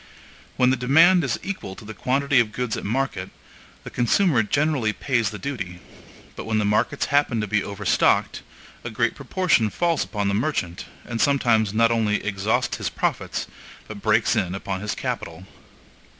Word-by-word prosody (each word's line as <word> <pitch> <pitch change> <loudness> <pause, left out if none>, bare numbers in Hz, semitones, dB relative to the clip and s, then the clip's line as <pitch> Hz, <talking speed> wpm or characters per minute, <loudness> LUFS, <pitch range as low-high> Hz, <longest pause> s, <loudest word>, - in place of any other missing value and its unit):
When 125 0 +4
the 130 - +1
demand 165 +8 +5
is 135 - -1
equal 185 - -5
to 105 - -12
the 110 - -7
quantity 135 +3 +1
of 115 -3 +1
goods 125 -1 -2
at - - -6
market, 110 -5 -2 0.5
the - - -9
consumer 125 - +2
generally 135 -1 0
pays 120 -5 0
the 105 - -7
duty; 100 -10 -5 0.6
but - - -7
when 110 -1 0
the 105 - +1
markets 105 +7 +1
happen 140 -5 +2
to 105 - -1
be 105 0 0
overstocked, 100 -1 +1 0.4
a - - -4
great - - 0
proportion 170 -12 +1
falls 170 - 0
upon 105 -2 -3
the 100 - 0
merchant, 100 - -2 0.2
and 115 -1 -3
sometimes 120 -7 +2
not 115 +2 +3
only 110 -3 +1
exhausts 100 +1 0
his - - -2
profits, - - -2 0.4
but - - -9
breaks - - +2
in 90 0 -1
upon 95 -1 -4
his 105 - -3
capital. 85 +2 -5
115 Hz, 170 wpm, -23 LUFS, 105-140 Hz, 0.6 s, demand